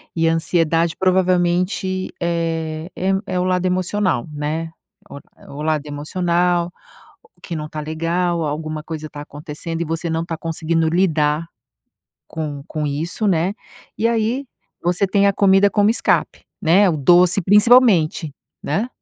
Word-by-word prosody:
E 165 0 +2
ansiedade 165 0 +1
provavelmente, 185 +1 +1
eh, 165 -1 -2
em 190 +1 0
é 185 -1 -1
o - - +1
lado 185 0 0
emocional, 185 - 0
né. 150 +2 -3 0.4
O, - - -9 0.2
eh, - - -17
o 145 +2 -8
lado 155 -1 0
emocional, 175 +3 0 0.7
que 170 - -6
não 150 0 -5
tá 155 - -6
legal, 165 +2 -1
alguma 155 +1 -4
coisa 155 -1 -7
tá 145 - -9
acontecendo 150 +3 -6
e - - -1
você 165 +2 -3
não 165 +1 -1
tá 165 -1 -4
conseguindo 165 0 -1
lidar, 160 -2 +1 0.8
com 150 -3 -5
com 150 -2 -3
isso, 165 +9 -2
né. 180 +1 +1 0.4
E 230 - +2
aí, 235 +4 0 0.4
você 180 +3 +1
tem 200 +1 +3
a 200 - +2
comida 195 0 +4
como 205 +1 +3
escape, 230 - +1 0.2
né? 185 +4 +4
O 160 - 0
doce, 175 +6 +4
principalmente, 205 - +4 0.3
né? 200 - -1
170 Hz, 145 wpm, -20 LUFS, 155-185 Hz, 0.8 s, comida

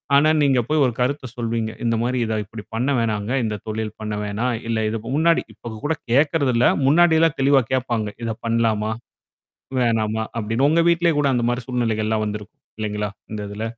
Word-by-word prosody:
ஆனா, 145 +2 +5
நீங்க 135 -3 +3
போய் 155 -1 +3
ஒரு 125 - 0
கருத்து 135 +2 0
சொல்வீங்க. 115 -2 -2
இந்த 115 0 +2
மாரி 125 +1 0
இத 110 -1 -1
இப்டி 105 +1 -9
பண்ண 125 +5 0
வேணாங்க. 110 -1 -1
இந்த 110 -2 -2
தொழில் 110 0 -3
பண்ண 105 0 -3
வேணாம்? 110 +5 -1 0.2
இல்ல 115 -1 0
இதுக்கு 110 0 -4
முன்னாடி 165 +1 +3
இப்ப 115 +2 -9
கூட 155 - +2 0.2
கேட்கறதில்ல. 135 -3 +3 0.2
முன்னாடிலாம் 160 +1 +4
தெளிவா 135 0 +5
கேட்பாங்க. 120 -4 0
இத 115 -1 -1
பண்ணலாமா? 115 -2 +1 0.9
வேணாமா 110 -2 +1 0.2
அப்டின்னு. 115 +5 +1
உங்க 165 +2 +3
வீட்லேயே 170 -1 +2
கூட 140 -1 +2
அந்த 120 -2 +1
மாரி 120 +1 -2
சூழ்நிலைகள்லாம் 110 -3 0
வந்திருக்கும். 105 0 -7 0.2
இல்லைங்களா? 105 -1 -2 0.2
இந்த 105 -1 -4
இதுல? 105 +2 -5
115 Hz, 170 wpm, -22 LUFS, 110-135 Hz, 0.9 s, ஆனா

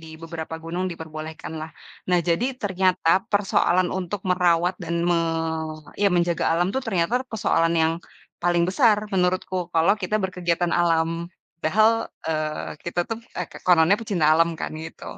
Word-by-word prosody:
di 160 - -12 0.2
beberapa 165 -1 -6
gunung 175 +3 -3
diperbolehkan 160 -1 -7
lah. 155 - -5 0.4
Nah, 180 -1 +4
jadi 170 +8 +2
ternyata 185 -4 +2
persoalan 185 -3 +2
untuk 190 +1 -3
merawat 180 -1 +2
dan 170 -1 -3
me 175 -1 +3 0.8
iya 205 - +5
menjaga 170 -1 +1
alam 175 +1 +2
tuh 265 - 0
ternyata 190 0 0
persoalan 165 -6 +1
yang 160 0 +3 0.5
paling 175 0 +2
besar 215 +4 +4 0.2
menurutku 180 -1 0
kalau 165 +4 +4
kita 200 +4 0
berkegiatan 180 -3 -1
alam. 165 0 +1 0.3
Padahal, 220 +8 +3 0.2
eee, 155 -1 -2
kita 170 0 -2
tuh 225 0 -4 0.2
eh, - - -1 0.2
kononnya 180 +3 +5
pecinta 175 -9 +2
alam 165 +1 +4
kan - - -5
gitu. 160 +1 -8
175 Hz, 145 wpm, -24 LUFS, 165-185 Hz, 0.8 s, iya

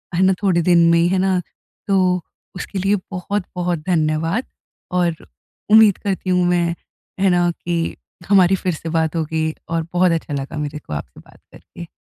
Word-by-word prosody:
है 180 - +1
ना, 190 0 +5
थोड़े 180 -4 +3
दिन 175 0 +4
में 170 - +4
ही, 170 - +3
है 190 +2 +1
ना। 190 -1 +2 0.5
तो 185 -2 +2 0.3
उसके 190 +2 -5
लिए 195 +2 +2 0.2
बहुत-बहुत 180 -2 -3
धन्यवाद, 165 +6 0 0.5
और 175 -2 +1 0.5
उम्मीद 215 -2 +7
करती 195 -2 -3
हूँ 180 -1 +3
मैं, 170 -1 +1 0.4
है 195 0 +3
ना, 175 -1 +3
कि 170 -1 -3 0.3
हमारी 190 -2 +5
फिर 180 -2 -2
से 165 +1 -6
बात 160 0 0
होगी, 160 0 -1 0.2
और 165 -1 -1
बहुत 180 0 +3
अच्छा 160 -3 -2
लगा 140 +2 -4
मेरे 150 0 -4
को 75 - -9
आपसे 75 - -7
बात - - -20
करके। 170 - -12
175 Hz, 175 wpm, -20 LUFS, 165-185 Hz, 0.5 s, उम्मीद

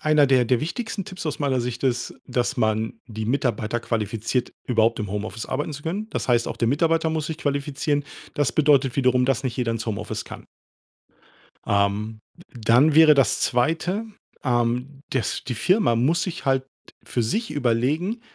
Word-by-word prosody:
einer 155 -1 +4
der 130 -2 +4
der 120 0 +2
wichtigsten 195 +4 -4
Tipps 185 -2 -7
aus 150 - -3
meiner 135 -3 +1
Sicht 120 0 -3
ist, 125 -2 0
dass 125 +2 -1
man 110 0 +1
die 110 -2 -5
Mitarbeiter 120 -3 0
qualifiziert, 115 +2 -2
überhaupt 115 -1 +2
im 105 -2 -4
Homeoffice 105 +2 -4
arbeiten 145 +3 -2
zu 145 +1 -8
können. 195 +7 -3
Das - - -3
heißt, 120 -1 +3
auch - - -5
der 115 - +2
Mitarbeiter 160 +3 +2
muss 160 -1 -1
sich 160 0 -5
qualifizieren. 145 -1 -1 0.3
Das 140 -5 +1
bedeutet 140 -4 +3
wiederum, 125 -2 +3
dass 135 +1 +1
nicht 130 -1 -3
jeder 120 -3 0
ins 115 0 -4
Homeoffice 110 0 -4
kann. - - -9 1.2
Ähm, 105 +2 0 0.2
d 130 -8 -14
dann 130 +7 +5
wäre 160 -1 +8
das 135 -2 +2
zweite, 165 - 0 0.4
ähm, 125 +2 0
dass 130 -6 -2
die 125 - -3
Firma 180 - +2
muss 160 +8 +2
sich 180 -2 -5
halt 135 0 +2 0.4
für 120 - -1
sich 220 - -1
überlegen, 145 - 0
130 Hz, 175 wpm, -24 LUFS, 115-150 Hz, 1.2 s, wäre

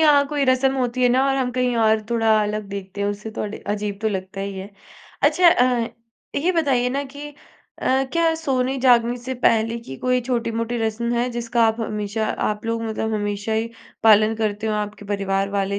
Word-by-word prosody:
यहाँ 290 -2 +5
कोई 290 -1 0
रस्म 265 +1 +2
होती 255 -1 -1
है 250 - +5
ना 260 +2 +3
और 270 - +1
हम 255 -2 0
कहीं 250 -1 0
और 220 -1 +3
थोड़ा 225 -2 +3
अलग 210 +1 -2
देखते 200 0 -7
हैं 200 - +1
उसे 205 +2 -5
तो 220 - -5
अडि 210 0 -5
अजीब 205 -1 -3
तो 220 - +2
लगता 190 -1 -5
ही 195 0 -4
है। 195 +2 -8 0.5
अच्छा 360 -1 +5
अ, 245 -5 +3 0.5
ये 335 +6 +1
बताइए 275 -7 +2
ना 275 +2 -1
कि 285 +2 -9 0.5
अ, 265 +1 +2
क्या 335 -1 +2
सोने-जागने 255 -5 +2
से 255 +2 -5
पहले 225 +1 +2
की 135 -12 -9
कोई 250 - +1
छोटी-मोटी 235 -1 -2
रस्म 225 +1 -1
है। 240 +1 +1
जिसका 235 0 0
आप 225 +1 0
हमेशा 210 0 -2 0.2
आप 210 0 -3
लोग 230 0 -1
मतलब 220 0 -2
हमेशा 205 +1 -2
ही 225 +1 -1 0.3
पालन 215 0 +6
करते 215 -1 -2
हो, 215 - 0
आपके 210 0 -4
परिवार 195 -1 -1
वाले 200 0 -1
230 Hz, 200 wpm, -22 LUFS, 210-255 Hz, 0.5 s, पालन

